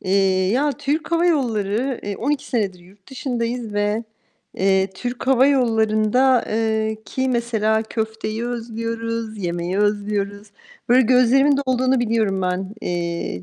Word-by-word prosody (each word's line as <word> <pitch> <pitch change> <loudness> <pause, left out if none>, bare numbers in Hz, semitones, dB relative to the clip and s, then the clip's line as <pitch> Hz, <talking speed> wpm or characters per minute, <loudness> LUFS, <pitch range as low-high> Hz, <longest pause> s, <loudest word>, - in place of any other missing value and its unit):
eee, 190 -1 +2
ya, 285 +5 +2
Türk 290 +4 -2
Hava 335 +1 +3
Yolları 240 - 0
eee, 200 -1 -4
12 285 +3 -1
senedir 200 -7 -1
yurt 190 +6 -20
dışındayız 240 -3 -3
ve 210 +2 0 0.5
eee, 190 0 +2
Türk 245 +4 -5
Hava 265 0 +5
Yollarında 235 -1 +3
ııı, 220 0 0
ki 260 +4 -2
mesela 225 -3 +1
köfteyi 220 0 -4
özlüyoruz, 230 -1 -4
yemeği 175 +1 -2
özlüyoruz. 205 0 -1 0.4
Böyle 250 +2 +6
gözlerimin 255 +3 +4
dolduğunu 255 0 +2
biliyorum 220 -5 0
ben. 185 +3 -2
Eee, 170 - -3
225 Hz, 125 wpm, -21 LUFS, 205-250 Hz, 0.5 s, Böyle